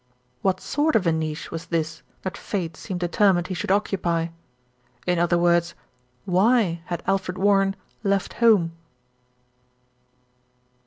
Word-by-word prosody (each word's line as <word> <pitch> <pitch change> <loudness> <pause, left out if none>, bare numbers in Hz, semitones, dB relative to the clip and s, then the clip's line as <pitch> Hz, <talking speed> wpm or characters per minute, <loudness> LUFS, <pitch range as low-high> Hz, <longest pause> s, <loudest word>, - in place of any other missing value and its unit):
What 185 -1 +1
sort 300 +8 0
of 200 - +3
a 165 - +4
niche 160 -1 -3
was 165 +1 -6
this 160 -1 -2 0.2
that 190 - -3
fate 170 -6 -4
seemed 180 +2 -6
deter 190 +3 +3
mined 175 -1 -1
he - - -2
should 180 - -4
occupy? 175 -4 +1 0.8
In 180 -1 +1
other 175 0 +3
words, 170 0 +2 0.5
why 190 -2 +3
had 175 -2 -4
Alfred 190 -1 -1
Warren 195 0 +3 0.3
left 200 -2 0
home? 210 -8 +5
180 Hz, 130 wpm, -24 LUFS, 170-195 Hz, 0.8 s, home